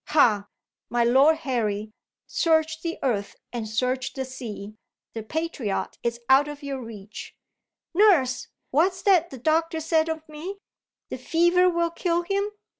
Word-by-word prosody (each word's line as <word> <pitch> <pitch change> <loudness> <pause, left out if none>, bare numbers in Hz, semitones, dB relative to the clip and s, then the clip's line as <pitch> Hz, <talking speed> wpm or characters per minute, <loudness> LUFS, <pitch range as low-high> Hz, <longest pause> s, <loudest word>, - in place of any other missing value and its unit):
Ha, 215 -9 +3 0.4
my 240 0 +2
Lord 270 +7 +5
Harry, 215 -5 -1 0.3
search 320 -1 +1
the 335 0 -3
earth 215 -7 -1 0.2
and 225 -3 -4
search 255 +3 -1
the 265 -1 -3
sea, 220 -5 -7 0.4
the 225 - -4
patriot 265 -5 -3
is 235 0 -2
out 270 +2 +5
of 295 0 -8
your 275 -2 -4
reach! 215 -3 -9 0.6
Nurse! 335 - +4 0.2
What's 360 +6 +2
that 355 -4 +4
the 265 - -9
doctor 320 +5 +1
said 320 0 +1
of 320 0 -4
me? 320 +6 -7 0.5
The - - -4
fever 345 +2 +3
will 340 -1 0
kill 340 0 0
him? 400 +3 -1
295 Hz, 145 wpm, -25 LUFS, 240-335 Hz, 0.6 s, Lord